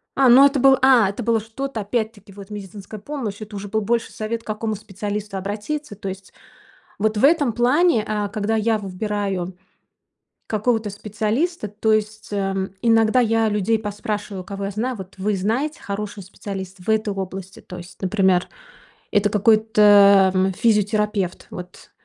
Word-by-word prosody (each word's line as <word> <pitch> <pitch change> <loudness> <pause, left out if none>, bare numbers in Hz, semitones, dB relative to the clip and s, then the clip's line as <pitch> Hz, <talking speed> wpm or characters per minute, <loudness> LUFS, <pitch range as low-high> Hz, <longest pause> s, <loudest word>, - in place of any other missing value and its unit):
А, 270 -2 +5
ну 265 +4 +8
это 280 -1 +3
был 270 +1 +6
а, 245 -7 +6
это 200 - -5
было 230 0 +2
что-то 225 +3 -5
опять-таки, 215 -1 -3
вот 200 +1 -12
медицинская 205 +1 -8
помощь. 225 -5 -5
Это 215 0 -8
уже 200 0 -6
был 220 +2 -1
больше 230 +3 -1
совет, 225 +1 -4
к - - -22
какому 215 0 -2
специалисту 205 0 -5
обратиться, 210 +7 -4
то 195 0 -7
есть. 190 0 -9 0.7
Вот 215 +1 0
в 210 - +1
этом 290 -5 +4
плане, 250 +1 +3
э, 210 -1 -1
когда 215 +1 -1
я 220 +1 +2
выбираю 195 -2 -3 0.9
какого-то 220 0 0
специалиста, 215 - -2
то 215 +2 0
есть, 215 0 -1
эм, 195 -1 -1
иногда 225 +1 +4
я 225 -1 +2
людей 210 +2 +1
поспрашиваю, 210 -2 -4
кого 200 +1 -6
я 200 - -3
знаю: 235 +5 -2
"Вот 190 -1 -10
вы 205 +1 0
знаете, 245 +11 -1
хороший 205 0 -5
специалист 195 -1 -7
в 180 - -15
этой 215 -1 +1
области?" 190 0 -6
То 180 - -10
есть, 175 +1 -12
например, 190 -2 +2 0.6
это 205 0 +3
какой-то, 205 -2 +5
м, 190 +1 +2
физиотерапевт. 210 -2 0
Вот. 180 +1 -10
210 Hz, 160 wpm, -22 LUFS, 195-225 Hz, 0.9 s, ну